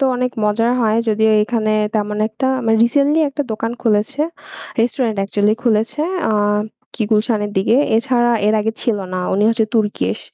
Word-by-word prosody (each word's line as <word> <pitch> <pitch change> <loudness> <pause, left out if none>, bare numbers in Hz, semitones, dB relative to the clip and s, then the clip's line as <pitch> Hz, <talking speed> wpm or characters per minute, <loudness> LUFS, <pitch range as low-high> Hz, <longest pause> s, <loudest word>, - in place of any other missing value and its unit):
তো 275 - +2
অনেক 250 0 -1
মজার 225 +3 +1
হয়। 220 -2 +2
যদিও 220 0 +2
এখানে 215 -1 -1 0.2
তেমন 210 0 -1
একটা 225 +4 -3 0.2
মানে 225 0 +3
recently 285 +5 +2
একটা 290 +1 -3
দোকান 225 +2 -3
খুলেছে, 225 +6 0 0.6
restaurant 230 -1 0
actually 205 +2 +1
খুলেছে, 225 +4 0 0.2
অ্যাঁ 210 -3 +1 0.4
কি 235 - -2
গুলশানের 210 -1 +1
দিকে। 215 +5 +2 0.2
এছাড়া 240 0 +1
এর 215 - +3
আগে 220 +1 -1
ছিল 220 -4 0
না। - - -2 0.2
উনি 205 - +1
হচ্ছে 230 -1 +2
Turkish. 205 - 0
220 Hz, 165 wpm, -18 LUFS, 210-240 Hz, 0.6 s, মানে